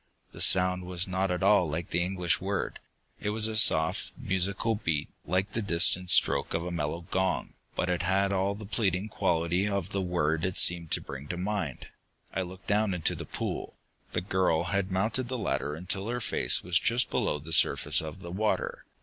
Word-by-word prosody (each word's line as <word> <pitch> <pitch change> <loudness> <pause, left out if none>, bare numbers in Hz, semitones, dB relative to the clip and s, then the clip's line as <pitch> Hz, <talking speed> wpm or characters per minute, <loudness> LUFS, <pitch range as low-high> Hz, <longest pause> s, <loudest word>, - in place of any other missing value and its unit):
The - - -7
sound 90 0 +4
was 90 +1 -1
not 95 +1 -1
at 90 +1 -1
all 95 -4 +4
like 80 +2 -4
the 85 - +1
English 90 -2 0
word. 100 +1 -3 0.4
It 105 - -2
was 110 +1 +2
a 110 - -4
soft, 90 -4 +4
musical 100 -1 0
beat, 80 -9 -1 0.2
like 95 +5 0
the 115 - -2
distant 90 -1 +2
stroke - - +3
of 85 +1 -2
a 90 - -4
mellow 80 0 -3
gong, 95 0 -1 0.2
but - - -1
it 90 -1 0
had 95 +2 +1
all 100 +1 0
the 105 +1 -9
pleading 100 -1 -1
quality 85 +2 0
of 100 -2 -2
the 100 - -1
word 80 -3 0
it 95 0 -1
seemed 85 -2 +4
to - - +2
bring 70 +1 -8
to 90 - -4
mind. 95 - -3 0.4
I 95 - -1
looked 95 +1 -8
down 105 -2 +1
into 85 - +1
the - - -6
pool. - - -5 0.4
The - - 0
girl 90 -3 +1
had 100 +1 -1
mounted 110 +7 0
the 130 +1 -3
ladder 75 - -2
until 95 +5 -3
her 120 +1 -2
face 110 - +2
was 90 0 +2
just 120 0 +1
below - - 0
the 75 +3 -5
surface - - +4
of 80 +4 -8
the 85 - -8
water. 105 +4 -2
95 Hz, 200 wpm, -28 LUFS, 85-100 Hz, 0.4 s, sound